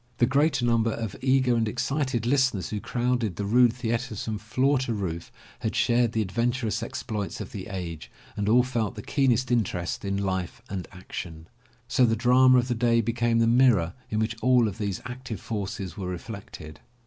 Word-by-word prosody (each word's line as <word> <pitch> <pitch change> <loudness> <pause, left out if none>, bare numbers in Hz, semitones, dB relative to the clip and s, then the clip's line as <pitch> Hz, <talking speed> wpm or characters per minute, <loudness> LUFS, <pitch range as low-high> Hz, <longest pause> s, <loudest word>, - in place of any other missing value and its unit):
The 120 - +4
greater 140 0 +2
number 115 -1 +2
of 110 -4 -4
eager 130 -2 +3
and 115 -1 +1
excited 125 +1 -1
listeners 130 -6 +1
who 105 - -2
crowded 120 -4 -1
the 100 - -3
rude 120 +3 +5
theatres 115 -2 -3
from 110 -2 -3
floor 130 +6 +1
to 125 -3 -2
roof 85 -5 -4 0.3
had 110 -3 -3
shared 120 -2 +2
the 110 - +1
adventurous 115 +3 -1
exploits 115 -4 -4
of - - -7
the 95 -3 -6
age 90 -5 -6 0.3
and 105 0 -1
all 125 +3 +5
felt 120 -3 -2
the 105 - -7
keenest 130 -3 +1
interest 90 -7 -1
in 100 0 -1
life 95 -1 -2
and 95 -3 -4
action. 85 -3 -8 0.4
So 125 +1 +3
the 115 - +2
drama 125 +2 +5
of 125 0 +2
the 125 - 0
day 115 0 +2
became 115 +1 0
the 115 - +4
mirror 115 -8 +4 0.2
in 105 - -2
which 110 +1 0
all 125 -1 +4
these 100 -2 -4
active 125 -4 -6
forces 95 -5 -4
were 95 -3 -4
reflected. 90 -4 -8
115 Hz, 185 wpm, -26 LUFS, 100-125 Hz, 0.4 s, rude